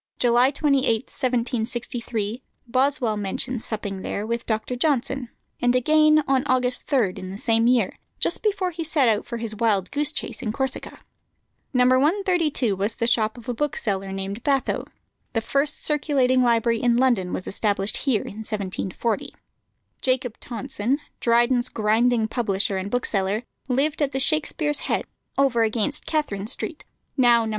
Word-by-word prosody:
July 245 +1 +4
28, 280 -1 +1 0.2
1763, 235 -2 -2 0.2
Boswell 255 -2 +1
mentions 210 +4 -2
supping 200 -3 -3
there 205 - -3
with 235 +1 -3
Dr. 220 +2 -1
Johnson; 265 -2 0 0.3
and 245 0 +3
again, 305 +4 +4
on 265 -1 +3
August 255 -1 0
3, 235 -10 +2
in 185 - -6
the 195 - -6
same 225 +1 +2
year, 240 -6 +2 0.2
just - - 0
before 395 -4 0
he 330 0 -4
set 310 -4 +2
out 215 -2 +1
for 235 - -4
his 225 -1 -3
wildgoose 225 +6 +1
chase - - -4
in 215 - -2
Corsica. 265 +3 -3 0.7
No. 250 -2 +3
132 300 - +2
was 200 +3 -2
the 230 - -1
shop 225 -1 +1
of 235 - -12
a 245 - -1
bookseller 210 -8 -2
named 195 +3 -4
Bathoe. 275 -2 0 0.5
The 225 - +1
first 280 +5 -1
circulating 275 -4 +2
library 230 -1 +2
in 240 -1 +3
London 240 -8 +2
was 185 - -3
established 200 -1 0
here 255 -7 +1
in 205 - -9
1740. 210 0 -3 0.7
Jacob 255 -3 -1
Tonson, 235 +2 -2 0.2
Dryden's 240 +1 +3
grinding 225 +1 +2
publisher 200 -4 0
and 190 +1 -3
bookseller, 210 -2 0 0.3
lived 285 +5 +1
at 285 -1 +1
the 265 - 0
Shakspere's 295 0 +1
Head, - - -1 0.3
over 270 -4 +3
against 225 +6 -1
Catherine 215 -11 -1
Street, 305 +5 -3 0.3
now 240 -3 +5
No. - - -3
240 Hz, 150 wpm, -24 LUFS, 220-270 Hz, 0.7 s, now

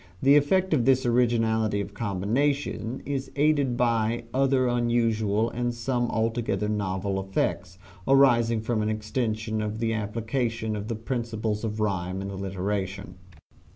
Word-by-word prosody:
The 140 +5 +5
effect 185 +5 +3
of 125 -6 +2
this 130 -1 +3
originality 115 -3 +2
of 100 - -5
combination 115 +4 -1
is 135 -1 -3
aided 145 -4 +2
by 115 -1 +1
other 135 -1 +2
unusual 115 -2 +1
and 120 0 -2
some 120 0 -1
altogether 115 -1 -1
novel 100 -2 -1
effects, 90 -2 -2 0.3
arising 120 -5 +4
from 110 0 -1
an 105 - 0
extension 110 0 -2
of 105 0 -3
the 115 0 0
application 110 +1 -2
of 105 0 -5
the 115 - -2
principles 110 -2 -3
of 110 -1 -3
rhyme 95 -3 -1
and 100 0 -5
alliteration. 95 -1 -4
115 Hz, 135 wpm, -26 LUFS, 105-120 Hz, 0.3 s, The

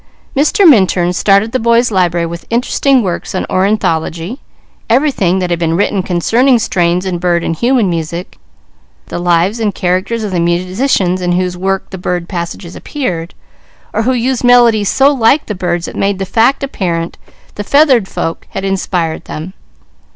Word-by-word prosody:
Mr. 305 +7 +3
Minturn 185 - +4
started 200 +4 +2
the 255 - 0
boys' 235 +1 +2
library 175 -3 +1
with 170 +1 -7
interesting 250 +2 +1
works 180 0 -4
on - - -1
ornithology, 185 - -1 0.5
everything 230 - +2
that 180 -2 -2
had 170 - 0
been 165 -1 0
written 200 0 +1
concerning 230 +9 +2
strains 180 -4 0
in 180 -2 -2
bird 175 -1 0
and 165 - -2
human 240 -3 +2
music; 170 +2 -4 0.7
the - - -4
lives 175 +5 +1
and 210 -3 -1
characters 185 +6 -1
of 205 - -3
the 180 - -1
musicians 185 +3 0
in 175 0 0
whose 180 0 -1
work 195 +1 -2
the 190 - -7
bird 175 -1 -3
passages 170 -1 -6
appeared, 175 - -4 0.6
or - - 0
who 255 +3 +1
used 255 +1 -1
melodies 235 -4 +4
so 275 +2 +3
like 265 +3 +2
the 210 - -4
birds 175 -2 -2
it - - -8
made 195 0 0
the 195 - -3
fact 230 +8 +2
apparent 170 -10 -3 0.4
the 205 - -5
feathered 265 -5 +3
folk 165 - -4
had 195 - -5
inspired 180 -4 -2
them. 160 +5 -7
190 Hz, 165 wpm, -13 LUFS, 175-235 Hz, 0.7 s, Minturn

